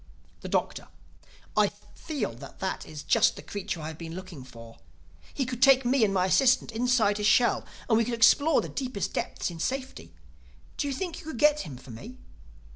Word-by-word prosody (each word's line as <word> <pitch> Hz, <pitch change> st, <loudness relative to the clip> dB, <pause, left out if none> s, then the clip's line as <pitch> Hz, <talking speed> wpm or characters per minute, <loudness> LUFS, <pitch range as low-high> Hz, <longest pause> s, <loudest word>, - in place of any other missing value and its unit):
The -, -, -8 dB
Doctor: -, -, -1 dB, 0.7 s
"I -, -, +4 dB, 0.3 s
feel 290 Hz, -, -4 dB
that -, -, -11 dB
that 190 Hz, -, -3 dB
is 150 Hz, -1 st, -8 dB
just -, -, +3 dB
the -, -, -10 dB
creature 195 Hz, -4 st, -5 dB
I 155 Hz, -, -5 dB
have 160 Hz, -, -10 dB
been 165 Hz, 0 st, -7 dB
looking 185 Hz, -7 st, -9 dB
for. 115 Hz, -2 st, -13 dB, 0.5 s
He 270 Hz, -, -2 dB
could 245 Hz, -1 st, -5 dB
take 270 Hz, -1 st, +6 dB
me 250 Hz, 0 st, +3 dB
and 205 Hz, -, +3 dB
my 185 Hz, -2 st, +2 dB
assistant 255 Hz, +4 st, +3 dB
inside 225 Hz, -3 st, +2 dB
his 210 Hz, -, +1 dB
shell 240 Hz, +1 st, +3 dB, 0.2 s
and 225 Hz, -2 st, +3 dB
we 230 Hz, -, +2 dB
could 235 Hz, +1 st, -2 dB
explore 285 Hz, +7 st, +5 dB
the -, -, -6 dB
deepest 255 Hz, -7 st, -4 dB
depths -, -, -3 dB
in 165 Hz, -, -9 dB
safety. 265 Hz, +8 st, -4 dB, 0.6 s
Do 285 Hz, -, -1 dB
you 280 Hz, -, -2 dB
think 355 Hz, +2 st, -4 dB
you 350 Hz, -, -13 dB
could 315 Hz, -, -5 dB
get 300 Hz, +3 st, +4 dB
him 145 Hz, -, -7 dB
for 130 Hz, 0 st, -13 dB
me?" 225 Hz, -, -10 dB
230 Hz, 200 wpm, -27 LUFS, 180-265 Hz, 0.7 s, take